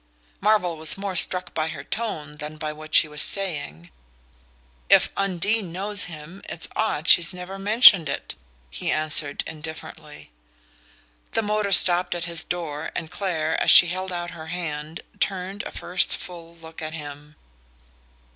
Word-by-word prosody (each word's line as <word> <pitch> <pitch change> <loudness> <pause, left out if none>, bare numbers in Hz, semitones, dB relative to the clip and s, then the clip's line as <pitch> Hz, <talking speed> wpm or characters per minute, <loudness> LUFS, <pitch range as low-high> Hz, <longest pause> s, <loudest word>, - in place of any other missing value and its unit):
Marvell 195 -5 +1
was 155 +3 0
more 195 -1 -5
struck 180 +1 +3
by 155 -1 -2
her - - -7
tone 155 -10 -5
than 150 +1 -8
by 155 0 -5
what 155 0 -6
she - - +6
was 150 0 -4
saying. 145 - -5 1.0
"If - - +5
Undine 195 +1 -1
knows 200 +3 +2
him 165 +3 -11
it's 165 - -1
odd 175 -7 -2
she's 175 +1 +5
never 180 +2 -8
mentioned 200 -4 +6
it," - - -5 0.4
he - - -5
answered 155 -2 +3
indifferently. 160 - -10 1.0
The 225 - 0
motor 210 -1 -1
stopped 180 -1 +5
at 170 -1 -3
his 170 -2 +1
door 160 -4 -5
and 160 -1 -5
Clare, 160 -5 -2
as - - +1
she 175 - +8
held 185 +1 -5
out 175 -1 -5
her 160 -1 -10
hand, 160 -2 -6 0.2
turned 195 +1 -3
a - - -9
first 180 +1 0
full 170 -1 -10
look 160 -1 -12
on 155 0 -6
him. 150 -1 -10
170 Hz, 155 wpm, -23 LUFS, 155-190 Hz, 1.0 s, she